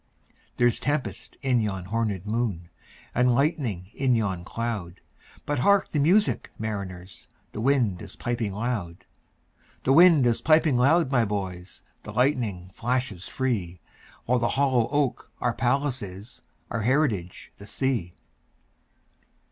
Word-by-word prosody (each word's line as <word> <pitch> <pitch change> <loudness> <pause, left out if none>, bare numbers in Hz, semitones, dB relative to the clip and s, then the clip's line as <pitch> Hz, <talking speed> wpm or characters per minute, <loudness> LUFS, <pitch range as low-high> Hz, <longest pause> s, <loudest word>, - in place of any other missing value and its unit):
There's 120 -1 +3
tempest 145 0 -3
in 130 -2 +3
yon 95 -4 -3
hornèd 105 -2 -2
moon, 105 -6 -2 0.4
And 125 0 +3
lightning 120 - -1
in 130 -3 +2
yon 95 -6 -1
cloud:But 115 +6 -5
hark 200 +7 +3
the 150 - -1
music, 185 +9 +2
mariners! 95 -4 -6 0.2
The 105 - -5
wind 120 -8 +2
is - - -9
piping 120 -3 -2
loud; 100 -5 -4 0.8
The 135 - +3
wind 165 -4 +7
is 120 -1 +2
piping 155 -2 +4
loud, 140 +4 +3
my 120 -4 +3
boys, 95 -4 -5 0.2
The - - -9
lightning 115 -9 0
flashes 120 -6 -2
free—While 115 +1 -3
the 120 - +1
hollow 130 -5 +2
oak 145 -3 -1
our - - 0
palace 130 +2 0
is, 100 +4 -9 0.3
Our 115 - -1
heritage 110 - 0
the 100 - -11
sea. 120 -12 -1
120 Hz, 125 wpm, -26 LUFS, 100-135 Hz, 0.8 s, wind